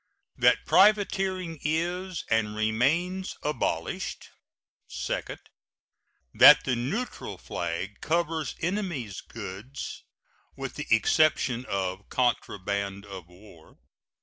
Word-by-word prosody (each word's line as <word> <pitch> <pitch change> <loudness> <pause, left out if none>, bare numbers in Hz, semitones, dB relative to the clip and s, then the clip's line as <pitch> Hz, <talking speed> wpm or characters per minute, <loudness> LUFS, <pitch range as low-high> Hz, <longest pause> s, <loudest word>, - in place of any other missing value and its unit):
That - - +3
privateering 190 -4 +3
is 175 +3 -2
and 110 -2 +1
remains 150 - 0
abolished. 115 - -2 0.6
Second. - - -4 0.9
That - - +9
the 125 - 0
neutral 180 - -4
flag 95 +5 -4
covers 160 -3 -1
enemy's 170 - -2
goods, 110 +5 -8 0.5
with - - -5
the - - -6
exception 125 0 +3
of 95 0 -3
contraband 100 -5 -1
of 95 -4 -9
war. 90 -2 -17
125 Hz, 90 wpm, -27 LUFS, -, 0.9 s, That